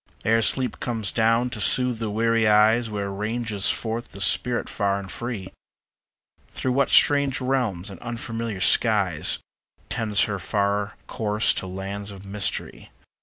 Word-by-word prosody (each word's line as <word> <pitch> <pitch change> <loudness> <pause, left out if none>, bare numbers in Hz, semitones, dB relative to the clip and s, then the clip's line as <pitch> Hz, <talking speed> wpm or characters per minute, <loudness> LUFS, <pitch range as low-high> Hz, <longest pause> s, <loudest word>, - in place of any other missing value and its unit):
Ere 115 +1 +3
sleep 125 +1 +3
comes 110 -5 -3
down 115 +2 +1
to 110 -4 -4
soothe 125 +1 +5
the 110 -2 -3
weary 115 +1 +1
eyes, 110 +2 +3
Where 100 -2 -4
ranges 105 0 -1
forth 115 +1 -3
the 100 - -10
spirit 120 +4 0
far 100 -2 -1
and 95 -1 -8
free? 120 -6 -6 1.0
Through 130 - -3
what 135 +2 +1
strange 140 -2 +4
realms 125 -9 -2
and 95 - -11
unfamiliar 115 -3 -5
skies. 100 -10 +3 0.5
Tends 105 -3 +1
her 100 -2 -3
far 100 +1 -1
course 105 -2 +1
to 95 - -4
lands 100 +2 -6
of 100 -1 -11
mystery? 100 0 -5
110 Hz, 145 wpm, -23 LUFS, 100-120 Hz, 1.0 s, soothe